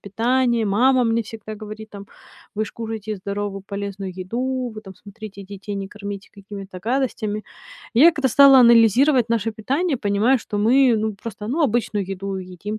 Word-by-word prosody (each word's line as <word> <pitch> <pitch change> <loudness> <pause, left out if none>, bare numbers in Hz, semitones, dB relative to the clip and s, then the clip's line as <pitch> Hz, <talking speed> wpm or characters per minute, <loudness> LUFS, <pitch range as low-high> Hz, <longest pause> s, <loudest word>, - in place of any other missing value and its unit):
питание. 235 +3 0
Мама 250 +5 +3
мне 230 0 +1
всегда 215 0 -9
говорит, 215 0 -9
там: 200 -1 -10 0.5
"Вы 215 +1 -1
ж - - -9
кушайте 220 -2 -5
здоровую, 200 0 -5
полезную 200 -2 -5
еду. 250 +6 -3
Вы 215 - -7
там, 195 -2 -12
смотрите, 200 0 -11
детей 200 +1 -7
не 195 0 -5
кормите 200 -1 -8
какими-то 200 -2 -9
гадостями". 220 -3 -2 0.5
Я 315 +8 +7
когда 285 -4 0
стала 275 +2 +7
анализировать 235 +2 +5
наше 230 -1 0
питание, 275 +9 -1
понимаю, 215 +4 +2
что 210 -2 -5
мы, 245 +3 +4
ну 215 0 -2
просто, 210 +1 -8
ну, 305 +7 0
обычную 220 -6 0
еду 195 0 -5
едим, 185 +3 -6
215 Hz, 165 wpm, -21 LUFS, 200-240 Hz, 0.5 s, Я